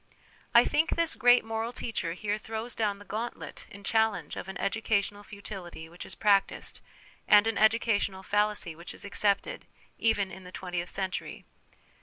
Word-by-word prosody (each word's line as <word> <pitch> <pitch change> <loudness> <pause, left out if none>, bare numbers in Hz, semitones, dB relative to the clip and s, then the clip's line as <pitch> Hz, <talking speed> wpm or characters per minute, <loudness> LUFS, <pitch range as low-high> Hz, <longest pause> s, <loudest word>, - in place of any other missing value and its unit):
I - - +9
think 310 +3 +2
this 335 -1 +2
great 245 -2 +5
moral 225 +1 -2
teacher 220 -9 -3
here 205 +3 -2
throws 225 +2 -5
down 210 -3 0
the 205 - -13
gauntlet 225 +4 -5
in 200 0 -12
challenge 220 -7 +1
of - - -6
an 190 - -6
educational 205 -1 0
futility 195 -5 -9
which 175 +1 -9
is 190 - -4
practised, 200 -2 +1 0.5
and 210 0 +7
an 225 -2 0
educational 215 -3 +2
fallacy 205 -4 0
which 170 +2 -9
is - - -5
accepted, 205 - 0 0.3
even 205 -4 +2
in 190 - -10
the 180 - -11
twentieth 180 -1 -4
century. 190 -1 -4
205 Hz, 160 wpm, -29 LUFS, 190-225 Hz, 0.5 s, I